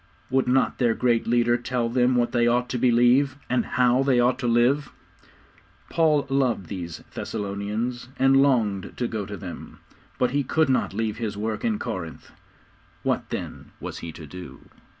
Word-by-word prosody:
Would 130 -1 +2
not 130 +1 +2
their 120 -3 +2
great 120 -2 +1
leader 120 0 +3
tell 120 -1 -1
them 125 +1 +2
what 120 -1 +1
they 120 -1 +2
ought 125 +1 +1
to 125 - -2
believe, 125 +3 +4 0.2
and 125 -2 +2
how 125 0 +2
they 135 -2 +3
ought 125 +1 +2
to 125 - -1
live? 125 +5 +2 1.0
Paul 155 -4 +3
loved 130 - 0
these 85 -4 -6
Thessalonians, 105 +4 -3
and 135 +1 +4
longed 110 -9 +1
to 120 - -1
go 105 -4 -4
to 100 0 -6
them. 95 -3 -9 0.4
But 125 -1 +1
he 145 +2 +1
could 155 +3 +1
not 130 - +1
leave 110 -1 -1
his 110 -3 -4
work 110 +1 -3
in 225 -3 +1
Corinth. 95 - -6 0.7
What - - -1
then - - -6
was - - -6
he 85 - -6
to 80 - -10
do? 90 +4 -11
120 Hz, 170 wpm, -25 LUFS, 110-130 Hz, 1.0 s, believe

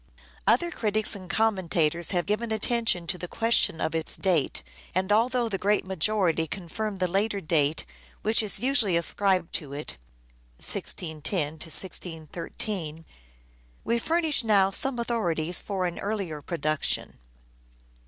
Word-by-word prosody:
Other 345 0 +3
critics 215 -5 +1
and 185 -2 -10
commentators 175 -6 +1
have 175 -3 0
given 215 +3 -1
attention 220 -4 +1
to 180 +1 -3
the 180 - -5
question 225 -6 +1
of 160 - -1
its 160 -1 +2
date, 175 -7 +1 0.3
and 190 +2 0
although 240 +3 +2
the 195 -4 -3
great 205 0 +1
majority 185 -3 +1
confirm 200 +5 -4
the 185 -1 +1
later 200 +3 0
date 155 -3 0 0.4
which 220 +2 +4
is 210 -4 +3
usually 245 -9 +3
ascribed 180 +1 +2
to 145 -3 -3
it 150 +2 -7 0.6
(1610 155 - +1
1613), 165 0 -2 0.8
we 235 0 0
furnish 320 -1 +1
now 200 -3 +4
some 270 +5 0
authorities 180 -8 0
for 190 -3 -2
an 175 -1 -3
earlier 195 -8 -3
production. 155 - -1
190 Hz, 130 wpm, -27 LUFS, 165-220 Hz, 0.8 s, which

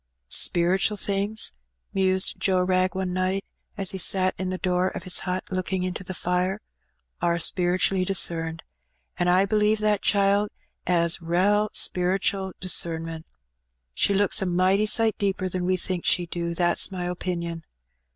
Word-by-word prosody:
''Speretual 190 +4 +2
things," 200 +2 -2 0.4
mused 190 -1 +1
Joe 185 -2 +2
Wrag 185 0 +1
ene 185 -1 -2
night, 185 +1 -1 0.3
as 195 -3 0
he 190 - -5
sat 185 0 +2
in 185 -1 -2
the 185 - -3
door 180 0 0
of 185 - -5
his 185 -1 0
hut 185 +1 -2
looking 185 0 -2
into 185 0 -4
the 185 0 -6
fire, 180 +3 -1 0.6
"are 170 0 +1
spere 175 +2 +1
tually 185 0 +1
discerned, 165 -3 0 0.6
an' 175 - +1
I 185 +2 +4
b'lieve 210 +1 +2
that 210 -1 +1
child 200 0 +2 0.4
^as 170 -1 +2
rale 200 +5 +2
speretual 190 +1 0
discernment: 165 -2 0 0.7
she 200 - +1
looks 205 +2 +2
a 190 - 0
mighty 185 +4 +2
sight 225 0 +3
deeper 195 -1 -1
than 180 0 -3
we 185 0 +1
thinks 180 -1 -2
she 175 - +2
do, 170 0 -4
that's 175 +2 +2
my 180 -2 -4
opinion. 170 -2 -4
185 Hz, 155 wpm, -25 LUFS, 175-195 Hz, 0.7 s, I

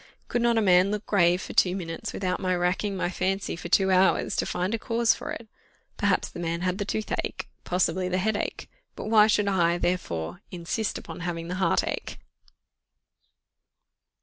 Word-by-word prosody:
_ - - -22 0.3
"Could 240 - 0
not 235 -1 +3
a 225 - +3
man 185 0 +5
look 210 0 -3
grave 180 -2 +3
for - - -7
two 180 0 +3
minutes 165 -3 -5
without 185 -2 -2
my 185 -1 0
racking 185 +3 0
my 180 - -1
fancy 190 +1 -1
for 170 +1 -7
two 190 +1 +4
hours 185 +1 +3
to - - 0
find 185 +4 -1
a 230 - -1
cause 230 0 +2
for - - -7
it? 235 - -6 0.5
Perhaps - - +1
the - - -9
man 170 0 -2
had 185 +2 -1
the 205 - -1
toothache; 215 +1 -3 0.2
possibly 180 0 0
the 185 - 0
headache; 205 +2 -2 0.3
but 215 - -5
why 215 -1 +7
should 210 -1 +2
I, 175 -3 +2
therefore, 90 - -2
insist 180 +5 -3
upon - - -9
having 170 -1 -4
the 180 - -2
heartache?" 170 - 0
185 Hz, 180 wpm, -26 LUFS, 175-205 Hz, 0.5 s, why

